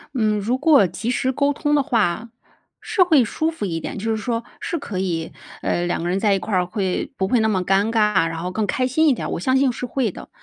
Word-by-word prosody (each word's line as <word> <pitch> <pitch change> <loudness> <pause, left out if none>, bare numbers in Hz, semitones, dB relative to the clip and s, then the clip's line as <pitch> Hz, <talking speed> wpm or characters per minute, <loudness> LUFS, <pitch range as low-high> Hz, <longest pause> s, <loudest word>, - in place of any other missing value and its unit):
嗯， 215 -3 +1
如 230 +6 0
果 285 - +5
及 220 +7 -5
时 260 +1 0
沟 280 +2 +1
通 295 +1 0
的 285 - +3
话 225 - 0 0.5
是 440 -4 +3
会 315 -7 +4
舒 315 +8 -1
服 315 -11 -5
一 165 -3 -2
点。 - - -6
就 220 +3 -3
是 220 - +1
说 230 +1 -2 0.2
是 340 - -3
可 210 -8 -6
以， 170 -4 -2 0.3
呃， 175 - 0
2 175 - -1
个 175 - -2
人 185 +2 0
在 205 -1 +3
一 195 - +1
块 195 +3 -5
儿 180 -1 +2
会 190 -1 -2
不 190 - 0
会 245 +3 +2
那 220 - +2
么 190 -4 0
尴 195 +4 +2
尬， 210 -6 +3
然 165 0 -5
后 180 +1 -3
更 215 +3 -1
开 255 +3 0
心 315 +5 +2
一 285 - +5
点， - - -4
我 - - -2
相 260 +9 +1
信 265 -1 +3
是 250 - -5
会 245 -3 -1
的。 - - -11
220 Hz, 275 characters per minute, -21 LUFS, 190-260 Hz, 0.5 s, 果